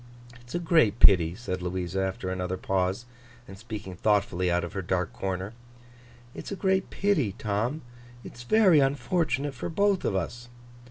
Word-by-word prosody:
'It's 120 +4 -10
a - - +1
great 160 - +3
pity,' 85 -3 +6
said 95 -6 -5
Louisa, 90 +1 -2
after 95 -1 -3
another 90 0 -3
pause, 95 +4 -1 0.4
and 95 - -10
speaking 95 -2 -8
thoughtfully 100 -2 +1
out 90 0 +1
of 85 - -6
her 95 - -3
dark 90 -1 -2
corner: 95 +2 -4 0.8
'it's - - -8
a - - -2
great 190 0 0
pity, 155 - 0
Tom. 110 +10 -2 0.4
It's 120 - -10
very 185 - +5
unfortunate 140 +1 0
for 125 - -5
both 200 +2 +1
of - - 0
us. 120 +7 -4
105 Hz, 160 wpm, -27 LUFS, 95-140 Hz, 0.8 s, pity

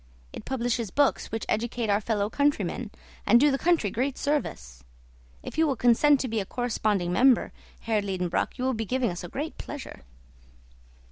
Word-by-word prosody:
It - - -8
publishes 240 -4 -1
books 285 +8 +1
which 225 - -3
educate 235 +1 -1
our 205 +1 +2
fellow 205 -2 0
countrymen, 245 -4 0 0.3
and 235 +4 +5
do 290 +2 +4
the 270 - -1
country 330 - +2
great 260 +5 -1
service. 65 - -3 0.6
If - - -6
you 320 - +4
will 275 - 0
consent 255 +5 +4
to 260 - -2
be 225 -2 -1
a - - -1
corresponding 215 -7 -1
member, 255 +3 +4 0.3
Herr 220 -2 0
Liedenbrock, 185 -1 -2
you 250 - -3
will 260 0 +1
be 225 -1 -2
giving 250 0 0
us 175 +1 -6
great 295 - -5
pleasure." 290 -2 -8
235 Hz, 175 wpm, -27 LUFS, 205-270 Hz, 0.6 s, and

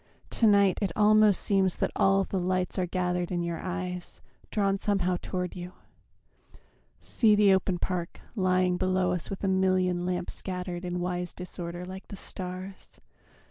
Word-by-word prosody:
To 225 - +3
night 200 -2 +4
it 195 -4 0
almost 215 -1 +5
seems 190 -3 +2
That - - -1
all 195 0 +4
the 190 - -2
lights 185 +1 -1
are 180 - 0
gathered 180 0 -1
in 175 -1 -1
your 170 -1 -3
eyes, 180 -1 -5 0.3
Drawn 195 -2 +1
somehow 185 -3 +1
toward 180 -1 -3
you. 180 0 -7 1.3
See 215 -3 +3
the 205 -2 +5
open 190 -1 +1
park 175 -1 -3 0.2
Lying 185 -2 +2
below 185 -1 +1
us 180 -2 -3
with 195 - -6
a - - +1
million 185 -2 +2
lamps 180 0 -2
Scattered 180 -1 -5
in 180 0 -2
wise 180 0 -3
disorder 175 -1 -6
like 190 +1 -9
the - - -8
stars. 185 0 -7
185 Hz, 160 wpm, -28 LUFS, 180-195 Hz, 1.3 s, almost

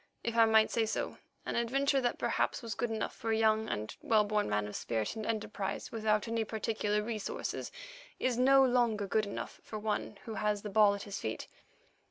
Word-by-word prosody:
If 235 - -2
I 230 -1 +7
might 220 -1 +4
say 225 -2 +1
so, - - -3 0.3
an - - -3
adventure 270 +4 +2
that 245 -1 0
perhaps - - 0
was 230 -2 -3
good 240 - -2
enough 220 -1 -2
for 225 - -4
a 220 - +2
young 220 0 +3
and 105 +1 -3
well 215 -2 +4
born 210 - 0
man 105 0 +1
of 105 - -7
spirit 110 - -2
and 220 -1 -4
enterprise 215 -3 -3
without 215 -1 +1
any 225 0 0
particular 215 -1 -1
resources, 215 -2 -4 0.5
is 255 -1 +1
no 270 +2 +6
longer 240 -5 +2
good 215 +2 +1
enough 200 - -6
for 215 - -6
one 210 -1 -2
who 225 - -5
has 210 -1 -1
the 210 - -5
ball 205 0 +5
at 200 - -6
his 200 -1 -5
feet. 110 0 -4
220 Hz, 205 wpm, -32 LUFS, 210-230 Hz, 0.5 s, I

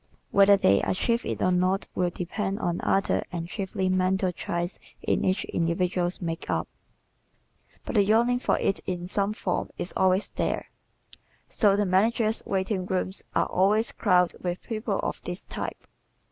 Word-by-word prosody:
Whether 200 0 +6
they 100 - +4
achieve 235 +5 0
it - - -2
or 185 - +3
not 185 +2 +1
will 180 -1 +1
depend 190 +3 -3
on 175 -6 -1
other, 195 - +1
and 170 -2 -4
chiefly 190 0 -2
mental, 185 0 +1
traits 175 +1 -3 0.2
in - - +1
each 190 +1 +1
individual's 175 +1 0
makeup, 165 -2 -2 1.2
but - - -4
the 205 -4 +5
yearning 235 +4 +3
for - - +1
it 195 - 0
in 180 -1 -3
some 200 +2 0
form 215 - -2
is 175 - -3
always 190 +1 +2
there. - - -2 0.8
So 205 -3 +3
the 205 0 +1
managers' 215 +4 +2
waiting 190 -1 -1
rooms 190 0 -2
are - - +3
always 210 +4 +2
crowded 180 -1 +2
with 180 0 -3
people 220 +1 -2
of - - -3
this - - -6
type. - - -6
190 Hz, 155 wpm, -27 LUFS, 180-205 Hz, 1.2 s, Whether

